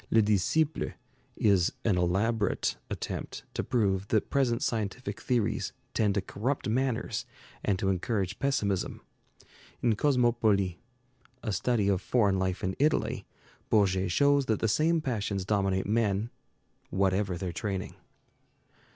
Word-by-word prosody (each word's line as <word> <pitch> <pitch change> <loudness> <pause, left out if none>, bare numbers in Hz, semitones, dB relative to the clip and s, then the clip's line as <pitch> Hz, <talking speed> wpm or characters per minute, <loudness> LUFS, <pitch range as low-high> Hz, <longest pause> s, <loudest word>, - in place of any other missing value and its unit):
'Le 115 - +4
Disciple' 110 - +1 0.4
is 95 -5 +3
an 105 -5 +3
elaborate 100 +5 +1
attempt - - -5
to - - -2
prove 100 -5 +1
that 110 -1 0
present 125 -4 +2
scientific 115 +3 -2
theories 115 -4 0 0.2
tend 105 -3 +2
to 100 - +2
corrupt 125 +9 -2
manners 115 -1 0 0.4
and 100 -3 +1
to 95 0 -1
encourage 95 0 -1
pessimism. 105 -9 0 0.8
In 120 - +4
'Cosmopolis,' 115 - +2 0.7
a 110 - -1
study 105 +2 +1
of 100 -2 +2
foreign 100 -6 +2
life 95 -1 -1
in 95 +1 -1
Italy, 150 +2 +1 0.4
Bourget 95 -3 +3
shows 140 +4 +3
that 110 - +1
the 115 - +1
same 160 +8 +2
passions 105 -8 -2
dominate 95 -2 +1
men, 105 0 +1 0.6
whatever 95 0 +1
their 90 0 -4
training. 95 +2 -3
105 Hz, 125 wpm, -29 LUFS, 95-120 Hz, 0.8 s, Le